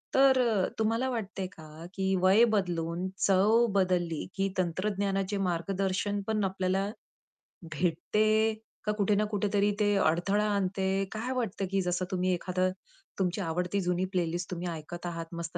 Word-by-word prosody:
तर 265 -1 +6
अ, 220 -6 +2
तुम्हाला 230 +4 +1
वाटतंय 210 -5 -3
का, 160 -1 -11
की 190 -1 0
वय 190 +5 +6
बदलून 175 -2 -1 0.2
चव 210 +5 +4
बदलली 180 -4 +1
की 195 0 0
तंत्रज्ञानाचे 195 +2 -1
मार्गदर्शन 195 +3 -1
पण 215 -1 0
आपल्याला 190 +1 0 0.8
भेटते 215 +7 +2 0.3
का? 210 - +1
कुठे 210 -1 +1
ना 210 +1 +2
कुठेतरी 205 0 +1
ते 205 -1 +3
अडथळा 195 +5 +2
आणते? 195 0 0
काय 225 +4 -3
वाटतं, 225 -6 -2
की 195 0 +2
जसं 180 0 -1
तुम्ही 185 0 +1
एखादं 185 +1 0 0.5
तुमची 185 +1 0
आवडती 180 +3 -1
जुनी 180 0 0
प्लेलिस्ट 175 0 -1
तुम्ही 180 0 -3
ऐकत 170 +2 -7
आहात, 165 -1 -4
मस्त 170 0 -5
190 Hz, 145 wpm, -29 LUFS, 180-205 Hz, 0.8 s, तर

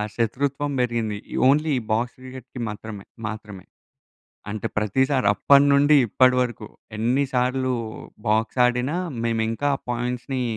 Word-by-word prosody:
శత్రుత్వం 140 +5 -1
బెరిగింది. 115 -4 -1 0.2
ఈ - - -3
ఓన్లీ 150 +4 +3
ఈ - - -7
బాక్స్ 120 +3 0
క్రికెట్‌కి 130 0 -10
మాత్రమే. 105 -1 -8 0.2
మాత్రమే. 105 -3 -8 0.9
అంటే 105 0 -4
ప్రతిసారప్పడినుండి, 140 +5 +4
ఇప్పడి 125 +4 +4
వరకు, 115 -4 -5 0.3
ఎన్ని 125 +6 +1
సార్లూ 125 +1 +1 0.5
బాక్సాడినా, 125 +6 +1 0.3
మేమింకా 115 +4 0
ఆ - - -21
పాయింట్స్‌ని 125 +2 -2
125 Hz, 110 wpm, -23 LUFS, 110-135 Hz, 0.9 s, ప్రతిసారప్పడినుండి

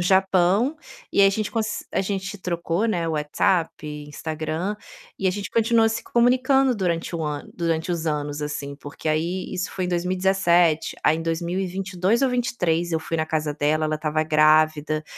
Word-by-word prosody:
Japão, 190 - +3 0.4
e - - +3
aí 195 - +8
a - - +2
gente 210 +1 -2
cons 225 -1 -2
a - - +1
gente 195 +1 -3
trocou, 170 +1 -1
né, 175 -7 0
o 165 - -1
WhatsApp, 155 +3 +1 0.4
Instagram, 160 +5 -3 0.4
e 190 - +1
a - - +2
gente 200 +1 -4
continuou 230 0 +3
se 230 +1 -3
comunicando 255 +3 +3
durante 175 -4 -2
o 165 - -2
ano 150 -1 -4
durante 165 0 -1
os 165 -2 -3
anos, 150 -1 -2
assim, 145 -1 -4
porque 145 +2 -7
aí 170 +4 -1
isso 180 0 -3
foi 185 - -3
em - - -2
2017, 180 -2 +2
aí 155 - +4
em 165 - -4
2022 185 +5 -1
ou 270 - +4
23, 180 -9 0
eu 165 - +1
fui 165 +1 -4
na 155 - 0
casa 155 -2 -2
dela, 155 +1 +1
ela 155 - 0
estava 155 0 -1
grávida, 155 0 +3
175 Hz, 180 wpm, -23 LUFS, 155-195 Hz, 0.4 s, aí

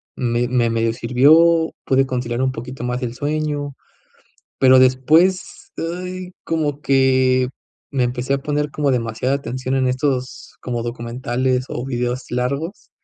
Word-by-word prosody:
me 120 0 0
medio 115 0 +1
sirvió, 155 +8 +4
pude 135 0 +3
conciliar 125 -1 -2
un 130 0 +1
poquito 125 +1 -7
más 125 +1 -2
el 120 -1 -3
sueño, 145 0 -2 0.9
pero 130 0 +6
después, 150 +9 +2
ay, 180 +2 -5
como 150 -3 -1
que 130 -2 +3 0.4
me 130 -3 +1
empecé 125 +2 -2
a - - 0
poner 150 +1 -1
como 145 -1 0
demasiada 120 +1 -1
atención 130 -1 -3
en 130 -1 +1
estos 130 0 -2
como 120 -2 -3
documentales 125 +2 -2
o 120 - -4
videos 125 -1 -2
largos, 140 - -3
130 Hz, 135 wpm, -20 LUFS, 125-145 Hz, 0.9 s, pero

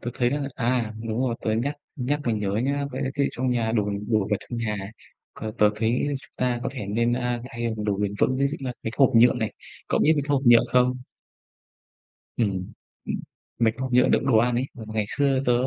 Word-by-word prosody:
tớ 120 - -4
thấy 120 -1 +1
là 145 0 -1
à, 120 -2 0 0.2
đúng 110 +1 -2
rồi, 125 -3 +1
tớ 110 - 0
nhắc 130 +7 -1 0.2
nhắc 145 +2 -1
mới 115 -2 +1
nhớ 105 -2 -1
nhá, 140 +1 0
có - - -4
lẽ 130 - -1
thiết 140 -1 +1
bị - - +1
trong 130 +1 -1
nhà 115 -2 0
đồ 105 -3 +1 0.2
đồ 110 -2 +3
vật 105 - +3
trong 120 - -6
nhà 110 -2 -1 0.6
có 110 -1 -5
tớ 105 -1 +5
thấy 115 +5 +1
chúng - - -18
ta 125 -1 0
có - - -1
thể 125 -7 -5
nên, 115 +4 +1
a, 125 -1 0
thay 120 -1 -3
bằng 110 -2 -4
đồ 105 -2 0
bền 100 -1 -1
vững, 130 - +2
ví 140 - +2
dụ 140 - -3
là 130 -2 -3
cái 115 - -2
hộp 135 -3 +5
nhựa 120 +3 +7
này. 110 -3 -2 0.4
Cậu - - +1
biết 160 - +5
mấy 145 - 0
cái 145 - -5
hộp 135 - +1
nhựa 120 -1 +8
không? 125 0 +3 1.4
Ừm. 95 -5 -1 0.9
Mấy 110 -1 +4
cái 120 - -23
hộp 130 -1 -3
nhựa 125 +1 +5
đựng - - +2
đồ 130 -5 +4
ăn 120 +2 +2
ấy. 125 - +1 0.2
Ngày 110 -1 -1
xưa 140 -1 +2
tớ 125 - +4
120 Hz, 240 wpm, -25 LUFS, 110-130 Hz, 1.4 s, nhựa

